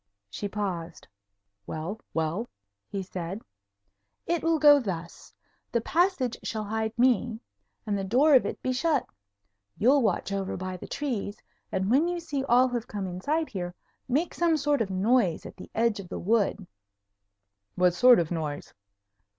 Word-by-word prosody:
She 205 - -4
paused. 195 -5 -4 0.6
"Well? 165 +8 -4
Well?" 165 +8 -2 0.4
he 195 -1 -3
said. 185 +2 -6 0.8
"It 340 -1 0
will 330 0 +2
go 290 -1 +7
thus: 175 -8 -6 0.4
the 235 - +2
passage 295 - +1
shall 220 -1 -3
hide 220 +2 -3
me, 240 -2 +2 0.5
and 210 - -1
the 195 - -2
door 260 +10 +4
of 260 - +7
it - - -5
be 255 - 0
shut. 285 +1 +1 0.7
You'll 270 +6 +4
watch 215 -3 0
over 195 -1 -2
by 185 0 -4
the 180 - -9
trees, 230 -8 -3 0.3
and 190 +3 0
when 290 +7 +4
you 350 0 -2
see 295 -5 -3
all 250 +1 +5
have 240 -1 -3
come 205 -2 -4
inside 285 - -1
here, 180 -3 -5 0.3
make 290 +7 0
some 335 -2 +2
sort 290 -2 +1
of 210 - 0
noise 195 -1 +2
at - - -9
the - - -11
edge 225 -2 +2
of 185 -3 -8
the - - -4
wood." 210 -1 +1 1.1
"What 180 -1 +3
sort 245 +6 +7
of 170 -1 0
noise?" 155 -4 -4
220 Hz, 160 wpm, -27 LUFS, 190-270 Hz, 1.1 s, go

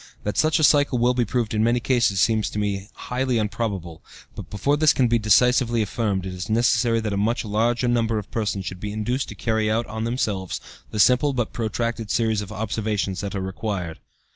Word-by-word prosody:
That 105 -1 -2
such 155 +6 +3
a 155 - 0
cycle 145 -3 +4
will 120 +1 +3
be 125 -1 +1
proved 115 0 -1
in 110 0 +1
many 120 +2 +2
cases 120 -6 +1
seems 110 0 +2
to - - -7
me 100 -1 -2
highly 125 -4 -1
probable, 95 -8 -4 0.3
but - - -9
before 120 +8 0
this 155 0 +4
can 130 - +2
be 120 0 +2
decisively 120 +2 +3
affirmed 100 -2 -2
it 95 - -5
is 90 +1 -6
necessary 115 +1 +2
that 105 -2 -2
a - - -1
much 115 +4 0
larger 115 +3 +1
number 115 -2 +1
of 105 - -6
persons 105 -4 -2
should 95 - -6
be 105 +1 -4
induced 120 +5 -2
to - - -8
carry 110 -2 0
out 115 +2 +1
on 110 +1 -5
themselves 105 -6 -2 0.3
the 105 - -5
simple, 125 +7 +4
but 120 -3 -2
protracted, 115 0 -2
series 110 -2 +1
of 105 0 -8
observations 105 -3 -2
that 100 0 -4
are 95 - -2
required. 95 -3 -4
110 Hz, 210 wpm, -23 LUFS, 105-120 Hz, 0.3 s, cycle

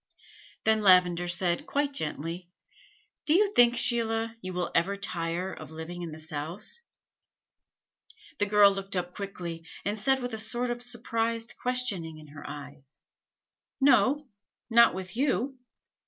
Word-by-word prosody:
Then 220 0 +3
Lavender 180 -3 +5
said, 175 0 0
quite 285 0 0
gently: 165 - -4 0.8
"Do 310 - +4
you 410 +2 +3
think, 240 0 +5
Sheila, 230 -2 +2
you 185 - -5
will 180 -1 -2
ever 200 +4 +1
tire 180 -1 -2
of - - -10
living 160 +2 -7
in 170 - -5
the 155 - -8
South?" 160 - -7 1.6
The 205 - +2
girl 205 -1 +6
looked 195 0 -5
up 180 0 -2
quickly, 175 -4 -6 0.2
and 205 +2 -2
said 265 +5 +2
with 245 -2 -4
a 220 - -3
sort 240 +3 0
of 240 0 -4
surprised 230 -1 -1
questioning 205 -11 -1
in 155 -1 -13
her 145 0 -11
eyes: 145 -1 -10 0.8
"No, 285 +1 +4 0.4
not 235 -4 +6
with 185 0 -6
you. 265 0 0
200 Hz, 140 wpm, -28 LUFS, 170-240 Hz, 1.6 s, girl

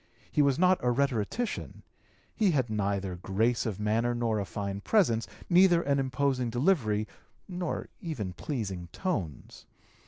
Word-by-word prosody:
He 150 - +3
was 140 -2 +3
not 185 +1 +4
a 125 - +3
rhetorician; 135 - -1 0.5
he 215 -4 +3
had 130 -9 +1
neither 100 -3 -1
grace 110 +7 0
of 105 -3 -4
manner 115 +3 +1
nor 115 -2 0
a 100 - -2
fine 100 +1 -4
presence, 120 - +2 0.2
neither 175 -1 +5
an 140 0 +1
imposing 130 -1 0
delivery, 115 - +1 0.4
nor 180 -2 -3
even 115 - -4
pleasing 95 - -4
tones. 95 - -4
120 Hz, 135 wpm, -29 LUFS, 105-150 Hz, 0.5 s, neither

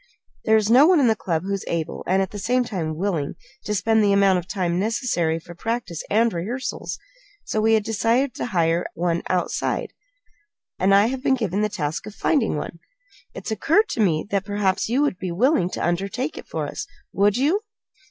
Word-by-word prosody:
There 220 0 +5
is 215 0 +1
no 265 +6 +7
one 360 -3 +5
in 275 - +4
the 225 -2 +4
club 165 -5 -2
who 200 +1 -2
is 195 - -3
able, 165 -2 -3
and 190 +1 +3
at 190 - -6
the 205 - -6
same 250 +5 +1
time 175 -9 -3
willing, 170 -6 -1 0.3
to 210 - -1
spend 220 +2 +2
the 200 -1 +3
amount 195 -2 +4
of 175 - -9
time 180 -3 -1
necessary 195 -7 0
for 170 +1 -10
practice 225 -4 -3
and 225 +2 +3
rehearsals. 220 +10 -4 0.5
So 215 - -1
we 225 +1 +4
had 215 - +1
decided 230 +5 +1
to - - -4
hire 170 -4 +1
one 170 0 0
outside, 180 -1 -1 0.9
and 195 +1 +4
I 200 +1 +6
have 255 +2 -2
been 265 - +3
given 210 -5 -1
the 215 - +1
task 160 -6 -3
of 210 - -9
finding 245 - +1
one. 165 - -6 0.6
It - - -8
has - - -3
occurred 330 - +2
to - - -4
me 170 -7 +2
that 200 -1 +1
perhaps 205 -1 0
you 260 +5 +2
would 285 -11 -1
be 185 -2 -3
willing 195 - +2
to - - -3
undertake 195 - -2
it - - -9
for - - -3
us. - - -5 0.3
Would 205 +2 +3
you?" 310 +11 +2
205 Hz, 210 wpm, -23 LUFS, 180-230 Hz, 0.9 s, no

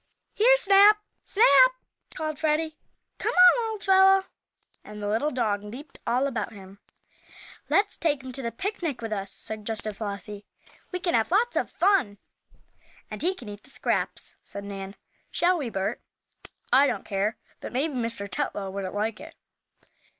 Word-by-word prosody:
"Here, - - +5
Snap! 410 -2 +6 0.3
Snap!" - - +6 0.4
called 310 -2 -4
Freddie. 315 0 0 0.4
"Come - - -1
on, 365 +6 +6
old 435 -2 -6
fellow!" 385 0 +5 0.6
and 210 0 -10
the 220 +9 0
dog 210 -5 -1
leaped 245 +9 -10
all 250 +3 +2
about 240 -4 -3
him. 195 -1 -13 0.9
"Let's 410 +1 +2
take 295 -5 0
him 260 - -7
to 270 +2 -1
the 235 -2 -3
picnic 335 - -4
with 225 -1 -3
us," 195 -1 -4
suggested 215 -1 -5
Flossie. 205 -1 -6 0.5
"We 365 - -3
can 350 -1 -1
have 225 -1 +2
lots 445 +7 +2
of - - 0
fun." 360 - +2 0.9
"And - - -5
he 365 +3 +2
can 245 - -11
eat 205 0 -8
the - - -14
scraps," - - -2
said 200 - -7
Nan. 195 0 -7 0.3
"Shall 355 0 +2
we, 265 -5 -3
Bert?" 195 -2 -3 0.7
"I 275 +3 +6
don't - - -3
care. 200 +2 -1 0.2
But - - -7
maybe 280 +5 -1
Mr. 230 -5 -3
Tetlow 200 -6 -3
wouldn't 195 -1 -5
like 215 +1 -2
it." - - -11
255 Hz, 155 wpm, -26 LUFS, -, 0.9 s, Snap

